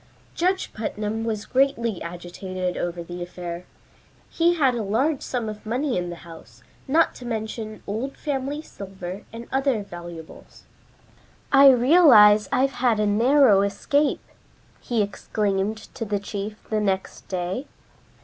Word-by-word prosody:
Judge 370 +2 0
Putnam 220 0 -3
was 215 -2 -3
greatly 245 -6 +1
agitated 180 +1 -5
over 175 0 -3
the 175 +1 -8
affair. 175 0 -6 0.7
He 345 +1 +3
had 275 -6 +3
a 235 - -2
large 255 +9 0
sum 245 -3 -3
of 215 -1 -7
money 250 +5 -1
in 175 -1 -2
the 175 - -6
house, 160 -8 -14 0.2
not 320 +5 +3
to - - -12
mention 220 -2 -5
old 230 +7 -4
family 285 +1 -3
silver 190 - -8
and 230 +1 -8
other 265 -5 +1
valuables. 175 -3 -11 0.9
"I 275 0 +8
realize 245 -6 +6
I've 265 +2 +2
had 235 -4 +3
a 210 - +2
narrow 225 0 +5
escape," 280 +9 0 0.6
he 230 -3 0
exclaimed 205 +1 -2 0.2
to - - -5
the 210 -2 -1
chief 205 +1 -6
the 215 - +2
next 195 -2 -2
day. 185 +9 -3
215 Hz, 140 wpm, -24 LUFS, 190-260 Hz, 0.9 s, I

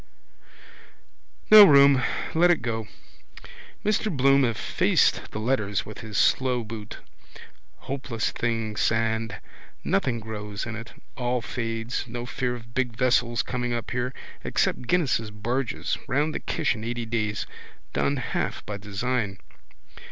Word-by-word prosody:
No 215 -1 +12
room. 140 -6 +7 0.3
Let 175 +2 +5
it 170 -8 +2
go. 110 -2 -2 1.0
Mr 215 0 +1
Bloom 135 -1 +4
effaced 115 -4 +2
the - - -6
letters 110 -4 0
with 105 - -9
his 110 -1 -5
slow 125 -2 +2
boot. 110 -1 -8 0.8
Hopeless 130 -5 -3
thing 115 -2 -2
sand. 115 +1 0 0.4
Nothing 120 +3 0
grows 105 -1 -5
in 110 -1 -5
it. 115 +1 -8 0.2
All 125 -1 0
fades. 115 0 -3
No 120 0 -5
fear 125 0 -2
of 115 -1 -12
big 125 -3 -1
vessels 120 -1 +2
coming 125 -1 -2
up 120 -1 -4
here. 125 +1 -1 0.3
Except 125 - 0
Guinness's 130 -9 +1
barges. 120 +4 -2
Round 145 +5 +1
the - - -2
Kish - - 0
in 110 - -7
eighty 120 0 -3
days. 105 -2 -2 0.5
Done 140 - +1
half 125 - -3
by 105 - -4
design. 105 0 -2
120 Hz, 130 wpm, -26 LUFS, 110-130 Hz, 1.0 s, No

